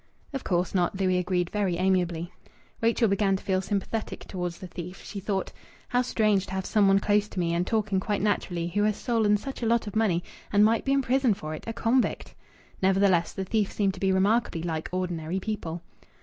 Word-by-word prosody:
"Of 270 - -3
course 175 0 0
not," 185 0 +1
Louis 185 -1 +2
agreed 180 -1 -1
very 195 -5 0
amiably. 175 -2 0 0.5
Rachel 230 0 +3
began 195 -1 +2
to 190 - -6
feel 190 -1 +1
sympathetic 205 +3 -3
towards 180 -2 -4
the - - -9
thief. 180 +1 -8
She 205 - -6
thought: 195 0 -2 0.4
"How 245 - +2
strange 215 -5 +1
to - - -7
have 190 0 -2
some 210 -3 +3
one 195 0 +5
close 205 +1 +2
to 190 - -6
me, 170 -1 +1
and 175 +1 0
talking 210 -3 +1
quite 205 +1 -1
naturally, 175 -5 0
who 205 +4 0
has 210 0 +2
stolen 220 -4 +2
such 270 +5 -7
a 230 - 0
lot 235 0 +2
of 205 - -7
money 195 -6 +2 0.3
and 205 0 +5
might 225 +1 +2
be 270 - +1
in 275 0 +3
prison 255 -3 +2
for 155 -3 -6
it 155 - -8
a 225 - -2
convict!" 235 +2 0 0.5
Nevertheless, 190 -2 +3
the 190 - -4
thief 210 0 0
seemed 195 -2 +1
to 185 - -10
be 195 0 +2
remarkably 190 -2 +2
like 160 -2 -3
ordinary 180 -1 -2
people. 180 -5 -4
195 Hz, 210 wpm, -27 LUFS, 180-215 Hz, 0.5 s, one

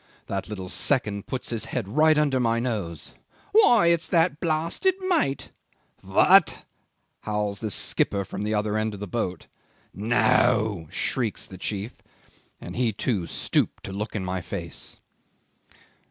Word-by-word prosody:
"That 100 +1 -4
little 95 -3 -6
second 105 -2 0
puts 130 -2 -4
his 115 -2 -3
head 120 -6 -3
right 155 +7 +4
under 145 -3 +2
my 115 -1 +1
nose, 105 -9 -4 0.4
'Why, 320 - +6
it's 170 -1 +2
that 165 -2 +2
blasted 170 - 0
mate!' 355 - 0 0.5
'What!' - - +4 0.5
howls 105 -1 -2
the 110 - -3
skipper 100 0 0
from 95 - -6
the 105 +1 -1
other 105 0 0
end 110 -1 -2
of - - -10
the 105 - -4
boat. 90 -3 -3 0.5
'No!' 110 -3 +2
shrieks 115 +5 -2
the 95 - -11
chief. 105 +5 -4 0.7
And - - -8
he 120 -2 +1
too 100 -4 -2
stooped - - -1
to 95 - -6
look 105 +3 -4
at 100 - -2
my 90 0 -3
face." - - -6
110 Hz, 145 wpm, -25 LUFS, 100-140 Hz, 0.7 s, Why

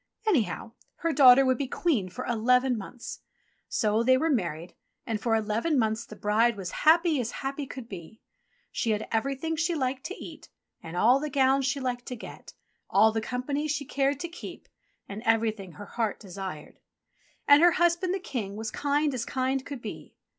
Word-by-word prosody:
Anyhow, 250 - 0 0.2
her 330 -1 -1
daughter 265 -1 +8
would 255 -2 +2
be 280 - -1
Queen 250 - 0
for 250 +8 -6
eleven 250 +2 +2
months. 230 +3 -8 0.5
So 215 0 +1
they 260 +2 +4
were 320 +4 +1
married, 175 - -2 0.3
and 220 -2 -3
for 230 -2 +1
eleven 220 +8 0
months 220 -1 0
the 215 - -10
bride 215 +2 +2
was 185 -3 -5
happy 320 -2 +4
as 230 - -3 0.2
happy 275 +1 -3
could 255 -3 -8
be. 190 +1 -10 0.5
She 230 - -2
had 210 +1 -3
everything 275 +7 -1
she 330 +2 0
liked 260 -2 -2
to 385 - -5
eat, - - -11 0.3
and 165 +2 -7
all 245 +8 +5
the 300 +1 -3
gowns 270 0 +3
she 275 +1 -1
liked 245 -2 -3
to 250 - -4
get, 225 - -11 0.4
all 215 +3 +5
the 220 0 -2
company 265 +6 -2
she 300 -1 -2
cared 275 +1 0
to 345 - -3
keep, 345 - -10 0.4
and 200 +2 -7
everything 220 -5 0
her 205 - -9
heart 225 0 -2
desired. 190 -6 -8 0.7
And 285 +1 +8
her 345 0 +6
husband 345 +2 +2
the 380 - 0
King 225 - -5
was 220 +1 -4
kind 290 0 0
as 245 -3 -2
kind 260 +1 -1
could 275 -4 -8
be. - - -8
250 Hz, 185 wpm, -27 LUFS, 220-285 Hz, 0.7 s, daughter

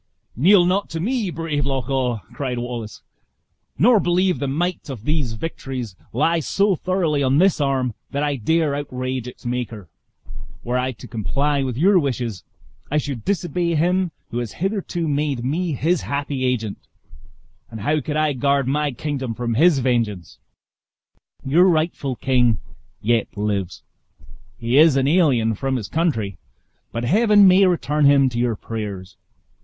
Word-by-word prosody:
"Kneel 175 - +5
not 190 +3 0
to 165 - -4
me, 225 +2 -1
brave 160 -4 -2
Loch 135 -2 -2
awe!" 125 -5 -1
cried 130 -3 -3
Wallace; 120 -3 -6 0.7
"nor 230 +2 +5
believe 180 0 +1
the 140 - -2
might 170 +5 -2
of 125 -6 -7
these 150 -5 -1
victories 125 - -5 0.2
lies 160 +5 +1
so 200 -1 +2
thoroughly 170 -4 0
on 135 0 +2
this 185 -2 +3
arm 130 -4 0 0.2
that 140 +1 -2
I 145 -1 0
dare 155 +5 +1
outrage 130 -3 -4
its 125 - -11
Maker. 120 -6 -4 0.7
Were 120 +1 -2
I 130 +1 -1
to - - -12
comply 140 +6 -1
with 130 -3 -3
your 185 +5 +5
wishes, 120 - -3 0.5
I 150 - 0
should 140 -6 -3
disobey 175 -3 -1
him 180 +3 +1 0.2
who 120 - -2
has 120 -4 -5
hitherto 185 -3 -2
made 145 -4 -1
me 165 +5 -1
his 160 +5 +1
happy 140 -2 -2
agent; 115 -5 -1 0.9
and 110 - -8
how 150 +7 +1
could 150 +3 -3
I 155 -1 +2
guard 140 0 +1
my 145 +1 0
kingdom 130 -3 -4
from 120 0 -2
his 160 +5 +4
vengeance? 115 -9 -1 1.1
Your 160 +7 +4
rightful 155 -6 0
king 125 -4 +2 0.5
yet 115 0 +2
lives; 100 -3 -2 0.7
he 120 +4 +2
is 155 -3 +6
an 135 0 +2
alien 140 -9 +3
from 135 +5 -2
his 110 -6 -3
country, 110 - -1 0.5
but 115 - -4
Heaven 205 - +5
may 190 +1 +6
return 150 -4 +1
him 140 -1 +5
to 120 -1 -4
your 120 -2 +1
prayers. 100 -4 -6
140 Hz, 155 wpm, -21 LUFS, 120-165 Hz, 1.1 s, is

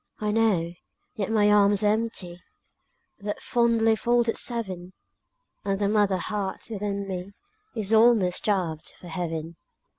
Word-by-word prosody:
I 210 -1 -1
know, 205 -7 +1 0.4
yet 200 -2 -2
my 210 -2 +3
arms 205 0 +4
are 210 0 +4
empty, 215 -6 -4 0.8
That 205 0 -4
fondly 230 -3 +2
folded 235 +1 +1
seven, 190 -7 0 0.7
And 195 -1 -1
the 200 0 0
mother 205 -2 +2
heart 205 +2 -4
within 200 -1 -3
me 190 +1 -5 0.4
Is 220 -1 -1
almost 220 -5 +5
starved 180 -7 -2
for 175 - -12
heaven. 165 -2 -4
205 Hz, 130 wpm, -26 LUFS, 185-225 Hz, 0.8 s, almost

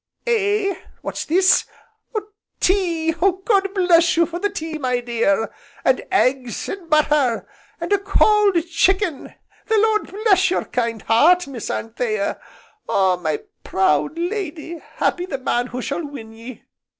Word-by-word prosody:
Eh, 410 -4 +1 0.3
what's - - -4
this? 370 +4 +4 1.0
Tea! 340 -4 +1
God 385 +3 +1
bless 345 -3 +4
you 335 - +5
for 345 +1 -6
the 410 +2 0
tea, 320 -5 -5
my 250 -3 0
dear! 230 -3 0 0.3
And 260 - +3
eggs, 255 - 0
and 370 -4 -7
butter, 295 -6 +2 0.3
and 340 +4 -1
a 405 - +3
cold 400 0 +3
chicken! 350 -1 0 0.3
the 440 - +2
Lord 430 0 +2
bless 390 -2 +3
your 370 - -1
kind 230 -3 -2
heart, 335 +11 +4
Miss 265 -5 -7
Anthea! 220 -3 -2 0.5
Ah, 190 -2 +3
my 155 -4 -3 0.2
proud 190 - +1
lady, 340 -3 -4
happy 355 +1 0
the 275 - -3
man 245 -1 -1
who 250 0 -5
shall 290 +4 -3
win 240 -6 -9
ye! 230 +2 -11
330 Hz, 140 wpm, -21 LUFS, 245-385 Hz, 1.0 s, you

